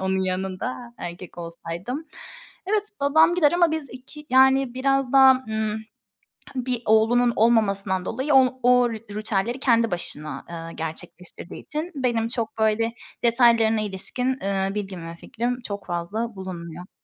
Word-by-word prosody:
onun 190 0 0
yanında 190 +6 -4
erkek 175 0 -8
olsaydım. 170 - -6 0.6
Evet, 420 +1 0
babam 315 +4 +4
gider 310 -4 +4
ama 345 -2 +3
biz 315 -4 -3
2, 280 +4 -12
yani, 265 -1 +4
biraz 270 0 0
daha, 265 -1 +8 0.2
ımm, 220 0 -2 0.7
bir 250 -2 -1
oğlunun 235 +3 +3
olmamasından 200 -5 +2
dolayı, 265 +5 -1
o 260 -1 +4
o 250 0 +5
ritüelleri 215 +2 -3
kendi 230 -5 +2
başına, 155 -3 0
ııı, 165 0 -7
gerçekleştirdiği 170 +2 -6
için 315 +4 -4
benim 240 -4 0
çok, 230 -2 -2
böyle, 220 +1 +1 0.3
detaylarına 230 -2 +4
ilişkin, 250 +6 -2
ııı, 195 0 -1
bilgim 190 -5 -5
ve 170 - -8
fikrim 240 +7 -4
çok 200 -1 -6
fazla 200 +6 -3
bulunmuyor. 180 -2 -8
225 Hz, 135 wpm, -24 LUFS, 190-255 Hz, 0.7 s, daha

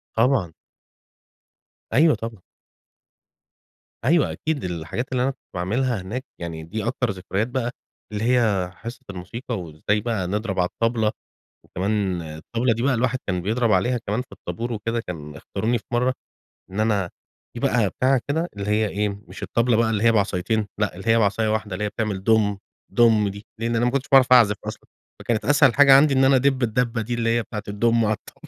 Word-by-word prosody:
طبعًا. 115 - +2 1.4
أيوه، 155 +1 +5
طبعًا. 110 -3 -7 1.6
أيوه، 160 +2 +3
أكيد 155 -3 -3
الحاجات 90 +9 -4
اللي 125 -1 +1
أنا 135 - +1
كنت 130 - -18 0.2
باعملها 110 +5 0
هناك، 125 +9 -5
يعني 80 -2 -5
دي 110 +7 -4
أكتر 125 -2 0
ذكريات 95 +4 -2
بقى، 125 -1 -2 0.4
اللي 105 +1 -3
هي 110 -7 +2
حصة 115 +3 -9
الموسيقى 110 +5 -5
وازاي 85 +6 -1
بقى 110 -6 -2
نضرب 100 -1 -2
على 90 - +2
الطبلة. 115 -2 +1 0.5
وكمان 95 -2 -1
الطبلة 115 +11 -2
دي 115 - -3
بقى 135 -1 +2
الواحد 130 +2 0
كان 90 -3 -1
بيضرب 115 +3 +1
عليها 120 +7 +2
كمان 105 +4 0
في - - -23
الطابور 120 +1 -5
وكده 115 +2 -2
كان 75 -7 -8
اختاروني 120 +2 -2
في - - -18
مرة، 125 +2 +2 0.6
إن 100 +3 -3
أنا 100 -5 +1 0.5
دي - - -4
بقى - - +2
بتاعه 130 -1 +2
كده 165 +4 0
اللي 100 0 -4
هي 105 0 +2
إيه، 105 +2 -1 0.2
مش - - -11
الطبلة 115 -1 +1
بقى 115 -1 +2
اللي 105 -1 0
هي 115 - +6
بعصايتين 105 +1 0
لأ، 105 - 0
اللي 95 - -10
هي 115 +1 +5
بعصاية 110 +1 +1
واحدة 105 -3 -1
اللي 105 - -3
هي - - 0
بتعمل 105 -3 -3
دوم، 105 -3 +3 0.3
دوم 110 -3 +4
دي، 100 +2 -9
لأن 115 0 0
أنا 120 - +2
ما 125 - +2
كنتش 135 0 -2
باعرف 130 -1 +6
أعزف 110 -5 +6
أصلًا، - - -7 0.3
فكانت 115 -2 -1
أسهل 145 -3 +5
حاجة 135 -1 +8
عندي 140 0 +5
إن 135 0 +4
أنا 135 0 +5
أدب 135 0 +2
الدبة 115 0 0
دي 120 +2 -3
اللي 115 0 +1
هي 120 - +1
بتاعة 105 -2 -6
الدوم 115 +2 +2
على 110 0 +2
الطا - - -13
115 Hz, 190 wpm, -23 LUFS, 100-125 Hz, 1.6 s, حاجة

